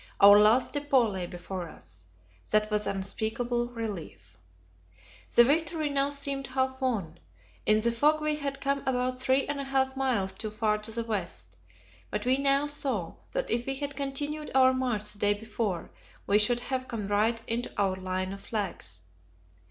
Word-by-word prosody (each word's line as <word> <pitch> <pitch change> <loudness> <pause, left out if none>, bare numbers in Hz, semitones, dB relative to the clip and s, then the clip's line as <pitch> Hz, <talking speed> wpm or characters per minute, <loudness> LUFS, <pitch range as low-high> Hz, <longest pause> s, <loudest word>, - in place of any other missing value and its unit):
Our 205 0 +9
last 220 +5 +4
depot 280 -5 +3
lay 190 -4 -4
before 175 0 -6
us; 90 - -11 0.4
that 215 0 +2
was 210 -1 +1
an - - -1
unspeakable 220 +5 -1
relief. 210 - -7 1.0
The 240 - +9
victory 310 +3 +1
now 280 0 +1
seemed 280 -2 -1
half 260 0 -1
won. 195 -11 -2 0.5
In 215 0 +5
the 235 +1 +2
fog 300 +6 +3
we 305 0 +1
had 280 -2 -3
come 275 0 0
about 255 0 0
three 260 +1 +3
and 290 -1 -3
a - - -2
half 265 -1 0
miles 245 -8 0
too 215 - -4
far 215 0 0
to 210 +1 -6
the 230 +1 -2
west; 180 - -4 0.5
but 210 +1 -3
we 260 +2 +3
now 275 +1 +3
saw 265 - -2 0.2
that - - -1
if 235 +2 0
we 270 - -1
had 285 0 -4
continued 290 +2 -3
our 260 -1 +6
march 240 -5 0
the 205 - -12
day 205 0 +3
before, 210 -4 -3 0.3
we 205 +1 +4
should 240 +3 +2
have 260 0 -3
come 230 -5 -4
right 215 +3 +1
into 235 +2 -2
our 195 -2 +2
line 185 0 -3
of 200 - -9
flags. 175 - -4
235 Hz, 175 wpm, -28 LUFS, 205-270 Hz, 1.0 s, Our